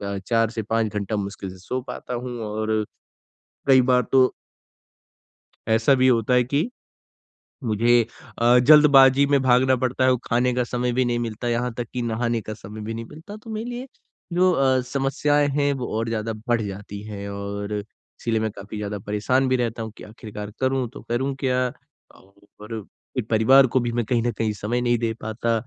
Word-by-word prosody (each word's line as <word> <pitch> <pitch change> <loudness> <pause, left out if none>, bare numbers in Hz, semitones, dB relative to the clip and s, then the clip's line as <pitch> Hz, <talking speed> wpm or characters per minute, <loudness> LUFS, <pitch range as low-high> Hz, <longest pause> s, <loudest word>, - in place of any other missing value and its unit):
अ, - - -3
4 115 -2 +2
से 115 0 -4
5 110 0 -1
घंटा 105 +1 -2
मुश्किल 100 -1 -4
से 95 - -12
सो 125 +7 -4
पाता - - -6
हूँ 120 0 -5
और, 110 +1 -1 0.8
कई 135 -1 +7
बार 125 0 +4
तो 130 -1 +6 1.4
ऐसा 115 +4 +4
भी 130 0 +3
होता 120 -1 +3
है 125 0 +5
कि, 145 - 0 1.0
मुझे 120 +2 +3 0.4
अ, 120 +1 +5
जल्दबाज़ी 140 0 +7
में 140 -1 +3
भागना 130 0 +4
पड़ता 130 +1 0
है, 130 - +5
वो 130 - +3
खाने 125 +1 +1
का 125 0 +1
समय 125 +1 -1
भी 130 +1 +2
नहीं 120 -1 0
मिलता, 120 0 -3
यहाँ 120 +1 0
तक 120 - -3
कि 125 - -2
नहाने 115 0 -1
का 110 0 -7
समय 105 +1 -10
भी 110 +2 -5
नहीं 115 0 -5
मिलता। 160 - -11
तो 215 +1 -12
मेरे 220 +2 -4
लिए 245 +2 -6 0.5
जो 180 +2 +4
अ, 135 -4 +3
समस्याएँ 140 +3 +1
हैं, 145 0 +1
वो 130 -3 -3
और 115 0 -2
ज़्यादा 115 0 -2 0.2
बढ़ 120 -2 +2
जाती 100 0 -7
हैं 100 -1 -6
और, 100 +1 -5 0.5
इसीलिए 115 -2 0
मैं 110 0 -1
काफ़ी 100 +1 -9
ज़्यादा 105 0 -4
परेशान 105 +7 0
भी 130 - +3
रहता 120 -2 -2
हूँ 110 - -5
कि - - -11
आखिरकार 105 -1 -8
करूँ 130 -1 0
तो 145 - -10
करूँ 130 +4 -1
क्या? 130 -2 +1 0.9
और 110 +1 -6 0.3
फिर 125 - 0
परिवार 130 +5 +6
को 130 +1 +1
भी 120 -1 -2
मैं 120 0 0
कहीं 115 +1 0
न 120 - +1
कहीं 110 -1 0
समय 105 +4 -2
नहीं 120 -1 +1
दे 115 -1 -1
पाता 110 +2 -2
120 Hz, 195 wpm, -23 LUFS, 110-130 Hz, 1.4 s, कई